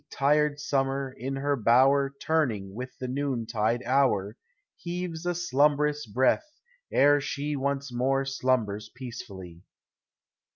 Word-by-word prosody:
Tired 145 +1 +2
summer, 135 -1 -1
in 135 +2 -4
her 140 +1 0
bower 135 +4 +4
Turning 115 -12 0
with 125 +4 -7
the 130 - -5
noontide 120 -4 -1
hour. 115 -6 +2 0.4
Heaves 175 -1 -5
a 175 - 0
slumbrous 150 -2 +1
breath 130 - +1 0.4
ere 145 +1 +5
she 145 +1 -3
Once 140 -1 -2
more 135 +2 +1
slumbers 115 -6 -1
peacefully. 100 -9 -9
135 Hz, 115 wpm, -27 LUFS, 120-145 Hz, 0.4 s, ere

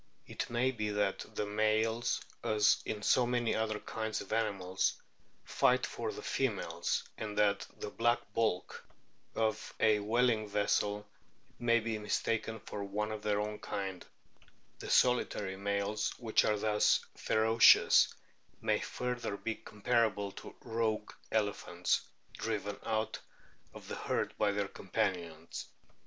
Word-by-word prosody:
It - - -4
may 120 +2 +2
be 105 -4 -2
that 105 -1 0
the 105 - -1
males, 110 +3 +1 0.2
as 110 0 +3
in 105 -1 -3
so 125 -2 +4
many 120 -1 +1
other 110 -1 0
kinds 110 -1 -3
of - - -6
animals, 100 -4 0 0.5
fight - - +3
for - - -4
the - - -8
females, - - -1 0.2
and 105 -1 -4
that 100 -1 +2
the 105 - -5
black 120 +1 +2 0.2
bulk 110 -6 -1 0.5
of 110 -1 -1
a 110 -1 +4
whaling 110 +1 +2
vessel 105 0 +1 0.5
may 115 -1 +4
be 110 -1 -3
mistaken 110 +1 -1
for 100 - -6
one 105 +2 -2
of 110 -1 -5
their 105 -1 +1
own 105 0 -3
kind; 95 -2 -4 0.8
the - - -7
solitary 105 -6 +2
males 100 +2 -1
which 115 -3 +2
are 105 - +2
thus 105 0 +3
ferocious 110 +1 +6 0.5
may - - +1
further 125 -4 -3
be 115 - -2
comparable 105 -2 0
to - - -10
" - - -37
rogue 110 -2 -1
" - - -29
elephants 105 -2 0 0.3
driven 105 -2 -3
out 110 0 -1 0.5
of - - -12
the - - -5
herd - - -1
by 105 -1 +3
their 100 0 -1
companions. 90 -6 -3
105 Hz, 140 wpm, -33 LUFS, 100-115 Hz, 0.8 s, ferocious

